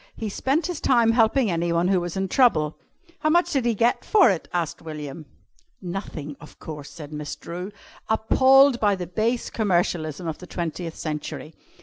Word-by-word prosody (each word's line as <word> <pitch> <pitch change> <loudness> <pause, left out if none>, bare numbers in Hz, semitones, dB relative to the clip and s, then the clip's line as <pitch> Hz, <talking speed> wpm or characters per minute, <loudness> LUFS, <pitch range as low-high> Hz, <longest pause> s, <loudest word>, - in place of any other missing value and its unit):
He 220 - -4
spent 275 - 0
his 350 -3 -4
time 235 -3 +4
helping 230 0 +3
anyone 170 +1 +1
who 190 -2 +2
was 175 +1 -4
in 190 0 -1
trouble." 165 - +3 0.4
"How 310 - +1
much 345 +3 +3
did 265 -4 0
he 235 -2 +2
get 235 +4 +1
for 400 - +5
it?" 180 - -3
asked 170 -3 -2
William. 150 -1 -7 0.5
"Nothing, 175 -6 -6
of 150 - -14
course," 150 -3 -8
said 150 -2 -10
Miss 150 -1 -5
Drew, 180 +4 -7 0.4
appalled 260 +4 +5
by 205 -2 +3
the 180 -2 -5
base 220 +8 -1
commercialism 175 -5 0
of 160 - -4
the 180 - -11
twentieth 170 -1 -4
century. 155 0 -5
180 Hz, 175 wpm, -24 LUFS, 160-235 Hz, 0.5 s, for